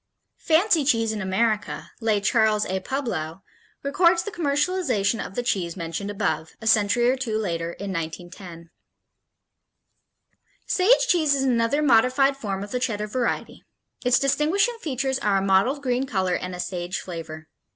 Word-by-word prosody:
Fancy 335 0 +3
Cheese 230 -5 +2
in 215 -1 -4
America, 210 +3 -1
lay 220 -2 +2
Charles 215 0 +2
A. 190 +1 -2
Publow, 190 - -4 0.4
records 340 +4 +3
the 415 - -6
commercialization 285 - 0
of 195 - -9
the 245 - -1
cheese 185 -7 -2
mentioned 170 +4 -4
above, 160 -5 -2
a 220 - -10
century 220 +2 +3
or 255 - +3
two 240 -5 -2
later, 170 -5 -3
in 200 +1 -6
1910: 170 0 -7 1.9
Sage 390 +7 +3
cheese 310 -5 +3
is 270 - 0
another 250 +3 +1
modified 270 +2 +4
form 200 -7 -4
of 205 - -9
the 250 - -1
Cheddar 220 -5 -2
variety. 235 +3 -3 0.4
Its 250 0 +4
distinguishing 340 - +1
features 265 -2 -2
are 205 -2 +1
a - - +1
mottled 200 +9 +2
green 255 +1 0
color 190 -5 0
and 180 0 -3
a - - -9
sage 175 0 -3
flavor. 160 -3 -8
225 Hz, 150 wpm, -24 LUFS, 190-275 Hz, 1.9 s, modified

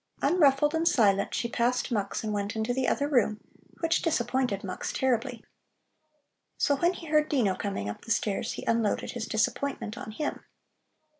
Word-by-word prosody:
Unruffled 295 -3 +4
and 325 +1 +1
silent, 200 - +3
she 235 - -1
passed 245 +2 0
Mux 205 -2 -1
and 215 -1 -2
went 205 +1 -2
into 220 +2 -1
the 260 0 0
other 285 - +1
room, 230 -7 +2 0.4
which 330 -1 +2
disappointed 250 -7 0
Mux 185 -2 -4
terribly. 245 -2 -1 1.1
So 285 - +2
when 345 +6 +2
he 345 - -9
heard 305 -1 +2
Dino 235 -10 +2
coming 195 - -3
up 105 - -5
the - - -11
stairs, 210 -3 0
he - - -7
unloaded 230 -2 0
his 230 -2 -5
disappointment 230 0 -1
on 255 - -7
him. 290 +8 -4
240 Hz, 165 wpm, -28 LUFS, 215-280 Hz, 1.1 s, Unruffled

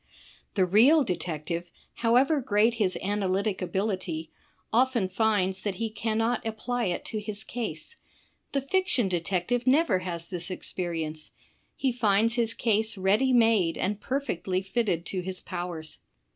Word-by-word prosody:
The 190 -3 +4
real 245 - +6
detective, 170 - -3 0.3
however 260 +6 +3
great 225 -1 +3
his 185 -3 +2
analytic 200 0 0
ability, 185 -4 -2 0.4
often 240 -4 +3
finds 190 -2 +1
that 200 -2 -2
he 225 +2 -3
cannot 225 +2 0
apply 235 +2 -2
it 180 -2 -2
to 215 - -3
his 210 0 -4
case. 225 - -5 0.5
The 275 - 0
fiction 275 - +1
detective 185 +7 -1
never 270 - +4
has 170 -2 -5
this 175 -1 -6
experience; 165 -4 -4 0.5
he 265 - 0
finds 225 -1 +2
his 230 -2 +1
case 220 -1 +1
ready 205 +8 +3
made 225 -8 +4
and 210 +1 -1
perfectly 190 -9 -2
fitted 190 -4 -1
to 185 0 -3
his 185 0 -5
powers. 175 -4 -6
205 Hz, 135 wpm, -27 LUFS, 180-235 Hz, 0.5 s, real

